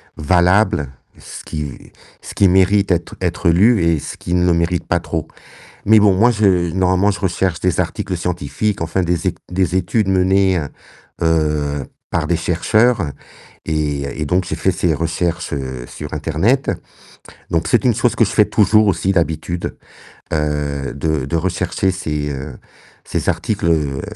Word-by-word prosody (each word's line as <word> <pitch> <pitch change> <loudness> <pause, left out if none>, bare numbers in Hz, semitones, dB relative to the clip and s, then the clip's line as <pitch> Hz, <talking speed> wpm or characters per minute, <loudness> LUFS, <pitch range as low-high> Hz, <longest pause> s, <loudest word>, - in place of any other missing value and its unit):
valable, 90 0 +2 0.3
ce - - -10
qui 75 -4 -7 0.3
ce - - -9
qui 100 - +4
mérite 95 +2 +3
d'être 85 -1 -1
être - - 0
lu 100 +4 +4
et 85 -1 +2
ce - - -7
qui 85 - -5
ne 90 0 +2
le 90 - +3
mérite 85 +1 0
pas - - +1
trop. - - -4 0.6
Mais 110 +1 +6
bon, 100 -2 +4
moi 115 +6 +4
je 95 -6 +2
normalement 95 +2 +2
je 100 - -5
recherche 90 -2 -1
des 90 -2 0
articles 90 - -2
scientifiques, 90 +4 -2
enfin 85 +3 -1
des 85 -1 -1
ét - - -1
des 90 -1 0
études 95 +3 +1
menées, 95 0 +3
heu 75 -4 -2 0.5
heu, 75 -4 0 0.2
par 85 -2 -1
des 85 - +1
chercheurs, 105 +7 +2 0.6
et 75 -2 -2
et - - 0
donc 90 +4 +1
j'ai 80 - -3
fait 95 +4 +1
ces 90 -2 0
recherches, 85 +2 -2
heu, 65 -3 -5
sur 75 0 -8
internet, 80 - +1 0.8
donc 85 -1 0
c'est 120 - +2
une 125 - +4
chose 120 -1 +1
que 115 - +4
je - - -3
fais 105 - +4
toujours 105 +1 +3
aussi 95 0 +1
d'habitude, 85 -1 -2 0.6
heu, 75 -2 -2
de 75 -2 -1
de 70 - -3
rechercher 90 +2 0
ces, 75 -5 -3
heu, 65 -1 -7 0.5
ces - - -2
articles, - - -2
heu, 75 -5 0
85 Hz, 165 wpm, -18 LUFS, 80-95 Hz, 0.8 s, Mais